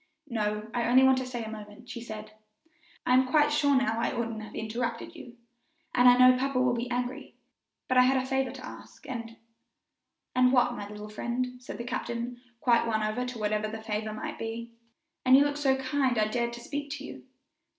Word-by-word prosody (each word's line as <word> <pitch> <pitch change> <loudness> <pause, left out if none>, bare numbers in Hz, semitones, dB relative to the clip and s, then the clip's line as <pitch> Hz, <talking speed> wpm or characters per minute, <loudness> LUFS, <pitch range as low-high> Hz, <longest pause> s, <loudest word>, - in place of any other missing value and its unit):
"No, 210 -2 -1
I 240 -1 0
only 255 +2 +6
want 265 0 +5
to 260 - -4
stay 240 -2 -4
for 220 - -6
a - - -7
moment," 215 +2 -10
she 245 -1 -7
said; 215 -2 -8 0.7
"I 250 - +3
am 260 0 +5
quite 295 +2 +4
sure 290 -1 +3
now 225 -3 +1
I - - 0
oughtn't 230 -3 -3
to 215 - -7
have 215 - -12
interrupted 235 +6 -3
you, 245 -6 -11 0.6
and 245 0 +7
I 245 - +6
know 255 0 +7
papa 270 -1 0
will 255 -1 +3
be 240 +1 -3
angry; 250 +3 -3 0.5
but 255 - +4
I 250 - +7
had 265 +1 +3
a 260 - 0
favor 265 0 0
to 260 +1 -8
ask, - - -12
and 230 -3 -6 0.5
" - - -56
"And 250 0 +5
what, 245 -2 +3
my 205 -3 -6
little 210 0 -8
friend?" 250 +3 -3
said 250 - -7
the 235 - -5
captain, 240 0 -4 0.2
quite 235 -1 +3
won 220 -1 0
over 215 +4 -1
to 250 -1 -6
whatever 215 0 0
the 220 +1 -7
favor 215 0 -2
might 215 - -6
be. 230 +1 -5 0.5
"And 255 +1 +7
you 285 - +5
looked 290 0 -1
so 270 -2 +3
kind 265 -2 0
I 215 - +3
dared 235 +1 -1
to 240 - -8
speak 285 +3 -5
to 285 -2 -7
you." - - -9
245 Hz, 225 wpm, -29 LUFS, 225-260 Hz, 0.7 s, and